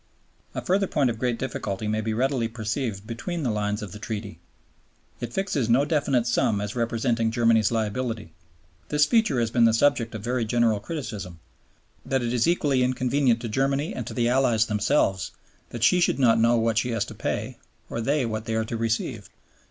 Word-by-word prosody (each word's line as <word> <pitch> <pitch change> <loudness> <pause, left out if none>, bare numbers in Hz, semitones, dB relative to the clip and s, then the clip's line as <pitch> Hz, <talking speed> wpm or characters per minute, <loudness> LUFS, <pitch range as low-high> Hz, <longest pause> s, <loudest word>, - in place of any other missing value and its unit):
A - - -3
further 195 +1 +1
point 135 -7 +1
of 110 - -7
great 125 -1 0
difficulty 110 -5 -4
may 110 +1 0
be 110 +1 -2
readily 125 +1 0
perceived 110 -2 -3
between 120 +9 -4
the 125 - +1
lines 105 0 -2
of 100 - -7
the 105 - -9
Treaty. 105 -5 -6 0.8
It 120 -1 -5
fixes 150 - -1
no 130 +5 +4
definite 140 -6 +1
sum 115 -3 +1
as 105 +2 -4
representing 115 -1 0
Germany's 115 -2 +3
liability. 110 -4 -2 0.6
This 150 0 +4
feature 220 - +2
has 115 -1 0
been 120 -1 +4
the 115 -1 +4
subject 115 -3 +2
of 105 - -6
very 120 +1 0
general 115 -1 +2
criticism, 105 - -6 0.6
that 135 -1 -1
it 120 0 -1
is 120 +2 +2
equally 145 -6 +2
inconvenient 125 -1 +1
to 120 - -4
Germany 135 +6 0
and 120 - -5
to - - -6
the 120 -1 +1
Allies 120 -3 +3
themselves 105 - +1 0.4
that 120 -1 -5
she 180 +8 +5
should 175 - +2
not 115 -4 +4
know 115 +1 +4
what 115 -1 +2
she 125 - -2
has 115 -3 0
to - - -9
pay - - -4 0.3
or 115 - -4
they 140 +2 +1
what 110 -1 -3
they 110 - -2
are 110 0 0
to 115 +1 -4
receive. 115 0 -2
115 Hz, 195 wpm, -25 LUFS, 110-130 Hz, 0.8 s, she